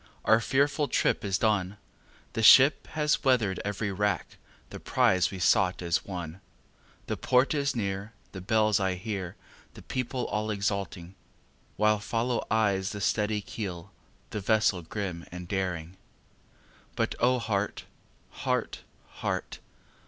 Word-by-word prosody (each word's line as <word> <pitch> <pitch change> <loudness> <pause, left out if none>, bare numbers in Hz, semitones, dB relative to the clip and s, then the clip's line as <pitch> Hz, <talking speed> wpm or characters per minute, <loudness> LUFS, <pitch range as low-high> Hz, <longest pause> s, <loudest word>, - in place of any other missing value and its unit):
our 110 - +5
fearful 140 +4 +1
trip - - +1
is 95 -2 0
done, 105 -3 0 0.6
The 115 - -2
ship 135 +6 +7
has 150 0 +1
weather'd 115 -8 +2
every 105 +1 -2
rack, 100 -2 -1 0.3
the - - -7
prize 95 -1 +2
we 95 - -7
sought 90 0 +3
is 85 -1 0
won, 90 -2 -7 0.6
The - - -2
port 130 +4 +2
is 140 -3 0
near, 100 -1 -3 0.2
the 95 - -8
bells 110 +1 +2
I 95 -1 0
hear, 95 -2 -5 0.4
the - - -12
people 125 0 -3
all 105 +1 -2
exulting, 100 -3 -3 0.6
While 105 0 +3
follow 115 +3 -1
eyes 105 -3 +1
the 105 - -5
steady 105 +1 0
keel, 100 -3 -6 0.4
the 105 - -3
vessel 105 -3 +2
grim 90 -1 -5
and 90 0 -8
daring; 90 -2 -3 1.0
But - - 0
O 125 +1 +3
heart! 105 -4 -2 0.5
heart! - - -2 0.3
heart! - - -4
105 Hz, 135 wpm, -28 LUFS, 95-110 Hz, 1.0 s, ship